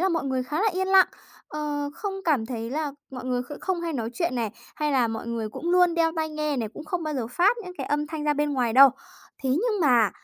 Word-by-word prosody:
là 380 - +3
mọi 330 -4 0
người 260 -1 0
khá 300 +9 -2
là 440 - +4
yên 380 +1 -1
lặng. 385 -1 +7 0.4
Ờ, 295 -1 -3
không 400 -2 -4
cảm 275 -9 +2
thấy 230 -1 -4
là 295 0 -2 0.2
mọi 255 -1 -7
người 250 -1 0
kh 290 +4 -9
không 370 -3 -1
hay 335 -1 -3
nói 230 -4 -3
chuyện 335 -7 -1
này, 230 -3 -1 0.3
hay 300 -1 0
là 245 -4 +3
mọi 225 +1 -5
người 230 -2 -3
cũng 340 +10 -4
luôn 360 -1 +4
đeo 325 -1 +2
tai 315 0 0
nghe 305 -2 -2
này, 225 -3 -2
cũng 310 - -8
không 340 +2 -3
bao 305 -1 -3
giờ 240 -4 -2
phát 360 - +3
những 360 - -7
cái - - -3
âm 295 +1 0
thanh 310 -1 -5
ra 295 - +3
bên 295 0 0
ngoài 245 -4 +1
đâu. 270 +1 +9 0.5
Thế 265 - 0
nhưng 415 - +1
mà 240 -8 +4
295 Hz, 270 wpm, -26 LUFS, 250-335 Hz, 0.5 s, đâu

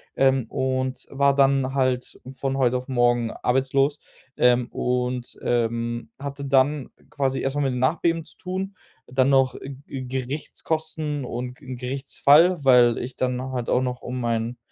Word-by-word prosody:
ähm, 135 -2 +3
und 130 0 -2
war 140 0 +3
dann 135 -1 +3
halt 130 -2 -1 0.2
von 135 0 -1
heute 125 -1 +2
auf 125 - -7
morgen 120 -2 +2
arbeitslos. 135 +3 +1 0.4
Ähm, 125 -1 +4
und, 125 0 -2
ähm, 115 -1 -1
hatte 140 0 -5
dann 135 +1 +2 0.2
quasi 135 -1 -1
erstmal 140 +2 -1
mit 130 - 0
dem 125 - -2
Nachbeben 165 +4 +1
zu - - -17
tun, 190 +1 -4 0.3
dann 130 +1 +2
noch 135 -1 +3
G 135 -1 -8
Gerichtskosten 150 +3 -3
und 125 +1 -5
Gerichtsfall, 140 +5 +2
weil 125 -3 +6
ich 125 +1 -6
dann 125 0 -1
halt 125 -2 -3
auch 125 - +3
noch 125 0 -3
um 125 0 -4
mein 115 +1 -1
130 Hz, 145 wpm, -24 LUFS, 125-140 Hz, 0.4 s, weil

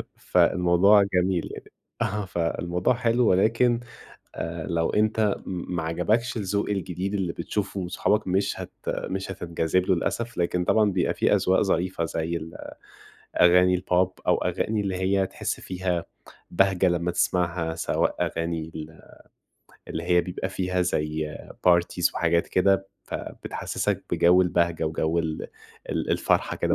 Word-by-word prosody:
فالموضوع 90 +4 +4
جميل 90 -1 +1
يعني. - - -11 0.3
أها، 105 0 -1
فالموضوع 85 +2 0
حلو 120 0 +2
ولكن، 115 +5 +3 0.6
آآ 80 -2 -4
لو 85 -1 0
أنت 110 -1 +2
ما 90 -2 -4
عجبكش 105 +10 0
الذوق 100 0 -1
الجديد 95 0 -3
اللي 95 -4 -1
بتشوفه 100 +3 -3
من 90 - -4
صحابك، 105 +3 0
مش 95 +2 0
هت - - -8 0.2
مش 95 0 -3
هتنجذب 85 0 -1
له 95 - +3
للأسف، 115 +7 -3
لكن 90 0 0
طبعًا 110 -2 +3
بيبقى 95 -1 0
في - - +2
أذواق - - +2
ظريفة 90 -1 0
زي 80 +1 -2
ال 80 +1 -9 0.9
أغاني 90 +1 +6
البوب، 90 0 +1
أو - - +4
أغاني 110 -1 0
اللي 95 -2 -2
هي 95 +1 +1
تحس - - -4
فيها 90 -2 -2 0.5
بهجة 95 0 +3
لما 85 0 0
تسمعها، 85 -2 0
سواء - - 0
أغاني 85 -1 -2
ال 80 0 -8 0.9
اللي 80 - -4
هي 90 0 +4
بيبقى 90 +1 -4
فيها 90 -1 -1
زي 75 -3 -2 0.3
parties 85 0 +2
وحاجات 85 0 +1
كده، 95 +1 +2 0.2
فبتحسسك - - -4
بجو 90 +2 +5
البهجة 85 -2 +1
وجو 80 +1 0
ال 80 -2 -3 0.4
ال - - -2
الفرحة - - +1
كده - - +1
90 Hz, 140 wpm, -25 LUFS, 85-95 Hz, 0.9 s, أغاني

